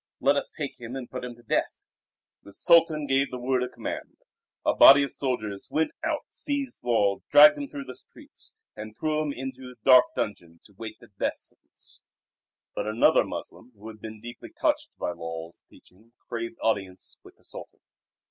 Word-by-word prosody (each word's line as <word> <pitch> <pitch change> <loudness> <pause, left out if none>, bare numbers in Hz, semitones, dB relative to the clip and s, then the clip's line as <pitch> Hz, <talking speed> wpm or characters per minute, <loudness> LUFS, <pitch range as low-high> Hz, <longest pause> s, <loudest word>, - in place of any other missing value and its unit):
Let 140 +3 +3
us 140 - -1
take 145 -3 -6
him 120 +2 -7
and 130 -2 -6
put 125 - -7
him 125 -1 -6
to 120 - -20
death." 110 - 0 0.7
The 100 - -14
Sultan 165 - +4
gave 135 0 +2
the 125 - -6
word 125 +1 0
of 125 - -3
command. - - -6 0.5
A - - +3
body 140 +1 +9
of 140 - -2
soldiers 110 -7 -3
went 160 +1 +1
out, - - -1
seized 280 - -3
Lull, 105 -5 +2
dragged 300 0 +8
him 285 - -4
through 280 0 -7
the - - -9
streets, - - -13 0.2
and 110 0 -9
threw 155 -1 0
him 150 -2 -2
into 130 -1 -7
a 125 - -17
dark 130 -2 +8
dungeon 85 -5 -4
to 100 - -20
wait 110 +1 -8
the - - -17
death - - 0
sentence. - - -13 0.7
But - - -3
another 110 +2 +4
Moslem 125 +2 -8
who 105 +2 -10
had 110 -1 -12
been 110 -1 -8
deeply 120 +2 -10
touched - - -1
by - - -2
Lull's 85 -1 -8
teaching 110 +6 -22
craved 115 -1 -5
audience 95 -4 -2
with - - -17
the - - -30
Sultan. - - -11
125 Hz, 185 wpm, -26 LUFS, 110-140 Hz, 0.7 s, body